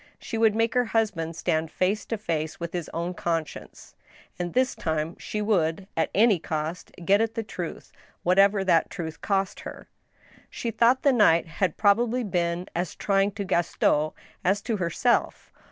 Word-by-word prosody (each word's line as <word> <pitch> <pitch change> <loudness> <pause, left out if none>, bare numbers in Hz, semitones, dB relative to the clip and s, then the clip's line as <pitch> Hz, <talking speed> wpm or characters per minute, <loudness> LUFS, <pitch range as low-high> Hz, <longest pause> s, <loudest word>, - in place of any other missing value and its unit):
She - - -7
would 220 -1 +3
make 225 0 +1
her 250 -1 +2
husband 200 -8 -1
stand 160 0 -1
face 195 +5 -1
to 225 - -2
face 160 -6 -3
with 170 -1 -5
his 175 -3 -4
own 170 +2 -3
conscience, 165 -3 -4 0.5
and 175 -1 -4
this 255 +1 +2
time 160 +1 -2
she 210 0 -3
would, 185 -3 +1
at 165 - +1
any 210 -3 +5
cost, 155 +2 -4
get 200 +3 +4
at 225 0 -1
the 225 - -2
truth, 180 -5 -7 0.3
whatever 195 +2 +4
that 170 -4 +3
truth 160 -3 -6
cost 195 -2 -1
her. - - -9 0.6
She 235 - -4
thought 235 +4 +3
the 280 - +5
night 170 -8 +4
had 165 +1 -2
probably 235 +4 +3
been 175 -3 -1
as 175 -1 -2
trying 195 0 +1
to 200 -1 -4
Gaston 160 -4 +1 0.3
as 195 +3 +1
to 225 - -1
herself 190 +7 0
190 Hz, 170 wpm, -26 LUFS, 165-220 Hz, 0.6 s, any